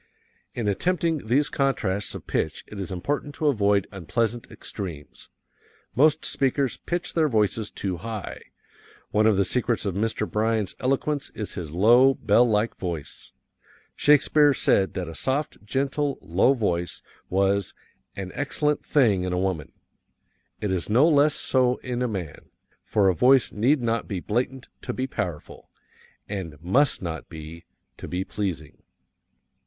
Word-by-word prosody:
In 115 -3 -2
attempting 165 - 0
these 140 +6 +3
contrasts 110 -8 -1
of - - -8
pitch 80 - -2
it 105 - -9
is 95 0 -4
important 145 +10 -3
to 155 - -3
avoid 105 -8 +3
unpleasant 115 +5 -2
extremes. 85 -8 -8 0.6
Most 155 +4 +3
speakers 135 0 +1
pitch 175 0 -3
their 160 -2 +2
voices 110 -2 +1
too 95 -3 -4
high. 110 +2 -6 0.7
One 110 +1 +3
of 105 -3 +3
the 100 - +3
secrets 120 +2 0
of 100 - -1
Mr. 105 +2 -1
Bryan's 110 -2 0
eloquence 140 +2 0
is 105 - -3
his 85 -6 -6
low, 120 - +5
bell 115 +4 +3
like 105 +1 +1
voice. 85 -6 -6 0.6
Shakespeare 145 0 +4
said 95 -4 +2
that 90 -3 -3
a 80 - -7
soft, 135 - -2
gentle, 140 +5 -1
low 95 +11 +2
voice 90 -7 -2 0.3
was 100 +1 +1 0.4
"an 95 -2 -5
excellent 150 +1 -1
thing 110 -11 +3
in 90 -1 -1
woman;" 95 -5 -2 0.9
it 105 - -2
is 90 0 -2
no 125 +9 +5
less 150 -1 +4
so 125 -1 +2
in 125 -1 -2
man, 90 -8 -6 0.3
for 100 -3 +2
a 95 - +4
voice 130 +7 +4
need 125 +5 +2
not 115 0 0
be 95 -3 -3
blatant 125 +7 -2
to 125 - -4
be 130 - -2
powerful, 90 - -5 0.6
and 90 -8 -6
must 110 - +2
not 80 -2 -5
be, 80 +1 -10 0.3
to - - -8
be 90 +1 -2
pleasing. 90 -8 -5
110 Hz, 145 wpm, -25 LUFS, 95-135 Hz, 0.9 s, low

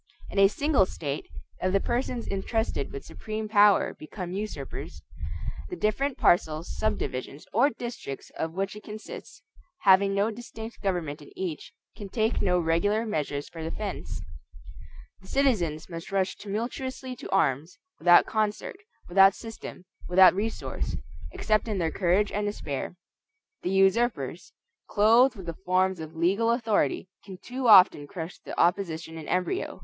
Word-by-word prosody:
In - - -1
a 195 - +8
single 270 -2 +2
state, 145 -5 -5 0.3
if 185 - +1
the 195 - +4
persons 240 +2 -2
intrusted 200 - -2
with 140 - -7
supreme 215 0 -5
power 205 -1 +5
become 175 +3 -7
usurpers, 190 -8 -6 0.7
the - - -4
different 260 +6 0
parcels, 160 -1 +2
subdivisions, 140 -9 -3
or 245 +7 +5
districts 235 - -7
of 160 - -2
which 195 +3 -2
it 210 - -9
consists, 215 +1 -9 0.4
having 195 0 +5
no 205 +3 +2
distinct 225 0 -9
government 170 -7 -2
in 145 - -13
each, 175 -5 -4 0.2
can 205 -2 -8
take 220 +3 0
no 180 -2 +2
regular 180 +7 +1
measures 145 -8 -2
for 165 - -9
defense. 160 +1 -5 1.0
The 190 - -16
citizens 185 - +1
must 165 0 -8
rush 195 -1 0
tumultuously 255 +5 -4
to 275 - -8
arms, 165 - +1 0.2
without 175 -1 +7
concert, 215 - -2 0.3
without 195 +2 +6
system, 225 -5 -9 0.2
without 185 +1 +8
resource; 165 - -3 0.4
except 215 - 0
in 210 -3 -1
their 165 -3 0
courage 195 +4 +2
and 205 0 -1
despair. 155 -6 -4 0.7
The - - -2
usurpers, 190 - +1 0.4
clothed 230 +5 +5
with 190 -4 -9
the 170 - -4
forms 185 0 +2
of 160 0 -8
legal 195 +8 +2
authority, 225 - +1 0.2
can 190 -2 -9
too 250 +6 -4
often 185 -8 +7
crush 170 -1 -7
the - - -7
opposition 170 -2 +1
in 160 -2 -8
embryo. 185 - -1
195 Hz, 145 wpm, -27 LUFS, 170-220 Hz, 1.0 s, a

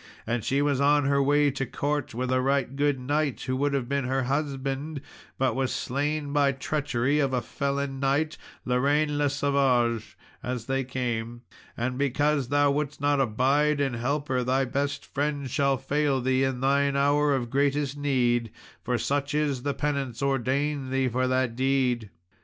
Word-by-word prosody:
And 115 -1 -1
she 140 +5 +1
was 140 -2 +1
on 145 0 +4
her 140 0 +3
way 145 +1 +3
to 135 0 -3
court, 145 -1 -2
with 125 +1 -2
a 130 0 +2
right 135 0 0
good 145 0 +2
young 125 -1 -10
knight, 145 -1 0
who 130 - -2
would 140 +1 +1
have 130 -3 -1
been 140 0 -1
her 130 +1 0
husband, 140 +2 -2 0.4
but 130 -3 +1
was 130 -1 0
slain 145 +2 -2
by 140 -1 +3
treachery 140 0 0
of 135 -2 +1
a 125 - +1
felon 140 +1 -2
knight, 140 +3 +1 0.3
Lorraine 145 +4 +1
le 145 -1 +2
Savage, 135 -5 +1 0.2
as 125 -2 -4
they 135 +1 0
came; 120 -2 -3 0.3
and 125 +2 -2
because 140 0 +1
thou 145 +1 +3
wouldst 150 0 -2
not 145 0 +2
abide 135 +5 +2
and 135 -4 0
help 140 +5 -1
her, 130 -1 0
thy 130 +2 +1
best 140 +2 -2
friend 145 -2 -2
shall 140 -2 +2
fail 140 +1 0
thee 130 +1 +1
in 130 -2 -1
thine 140 +1 +2
hour 145 +1 +3
of 120 -3 -3
greatest 140 0 +1
need, 125 -5 +1 0.3
for 125 -1 0
such 140 +3 -1
is 145 -4 0
the 140 +1 -2
penance 140 -4 -2
ordained 135 +1 0
thee 135 -1 +1
for 130 +2 0
that 130 -2 0
deed." 130 -4 +1
135 Hz, 175 wpm, -26 LUFS, 130-145 Hz, 0.4 s, on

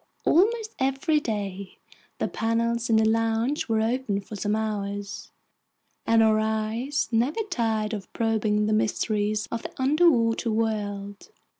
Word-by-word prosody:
Almost 435 +5 +2
every 270 +4 +1
day 200 -6 -4 0.4
the - - -1
panels 230 +1 -1
in 225 - +4
the 220 0 +4
lounge 225 +5 0
were 220 -1 +2
open 225 -3 0
for 200 +2 -9
some 205 +1 -1
hours, 205 -2 -4 0.8
and 225 0 +5
our 215 -1 +4
eyes 220 +5 -1
never 245 - +1
tired 220 -5 0
of 200 -3 -6
probing 215 -2 +1
the 215 - +1
mysteries 215 0 0
of 230 - -3
the - - -7
underwater 260 -5 +3
world. 205 - -2
225 Hz, 135 wpm, -26 LUFS, 210-235 Hz, 0.8 s, and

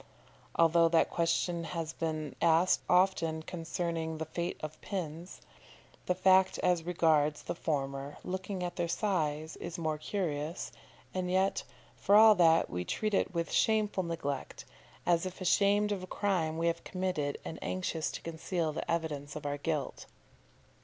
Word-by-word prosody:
Although 165 0 +5
that 165 0 +3
question 170 0 0
has 165 -1 -4
often - - -23
been 155 -2 -3
asked 170 +2 +3 0.6
concerning 165 -2 -3
the 160 - -3
fate 170 +3 -3
of 155 0 -6
pins, 175 -2 -5 0.7
the 180 - +2
fact 190 0 +4
as 180 -2 +3
regards 155 -3 +2
the - - -3
former, 140 -3 -3
looking 190 0 -4
at 175 - -4
their 175 -1 0
size, 160 -5 -1
is 170 - -6
more 155 -2 -2
curious 155 -3 -3 0.4
and 185 -1 -2
yet, 190 +1 +2 0.3
for 200 - +3
all 220 0 +9
that, 165 -4 +4
we 90 0 -3
treat 215 - -2
it 195 - +1
with 170 0 -1
shameful 215 -3 +2
neglect, 160 -6 -4 0.4
as 175 +1 +2
if 185 - -9
ashamed 205 +2 +3
of 200 -2 -2
a 185 - -7
crime 180 -6 0
we 165 - -1
have 170 0 0
committed 185 -6 -2
and 160 - -6
anxious 170 -4 -2
to - - -7
conceal 165 0 -2
the - - -5
evidences 150 -4 -2
of 155 -1 -7
our 145 0 -2
guilt. 150 -3 -3
170 Hz, 155 wpm, -31 LUFS, 155-185 Hz, 0.7 s, all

